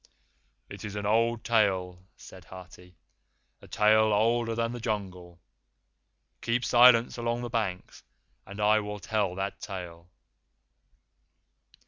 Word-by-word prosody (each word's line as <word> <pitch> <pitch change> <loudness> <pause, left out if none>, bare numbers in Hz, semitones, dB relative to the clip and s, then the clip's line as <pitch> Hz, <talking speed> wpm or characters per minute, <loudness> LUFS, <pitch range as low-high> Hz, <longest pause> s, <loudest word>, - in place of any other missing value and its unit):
"It 100 +5 -11
is 105 -1 -7
an 105 0 -4
old 115 +2 +1
tale," 95 -5 0
said 95 -1 -14
Hathi; 90 -1 -14 0.7
"a - - -15
tale 110 +1 +3
older 115 +2 +1
than 115 0 -1
the 120 - -7
Jungle. 95 -6 -5 1.0
Keep 120 +1 -1
silence 120 -1 +5
along 120 +1 -2
the 120 - -5
banks 100 -6 -4 0.4
and 100 +2 -11
I 105 +1 +3
will 105 0 -6
tell 100 -1 -2
that 95 +1 -4
tale." 90 -3 -8
105 Hz, 120 wpm, -27 LUFS, 95-115 Hz, 1.0 s, silence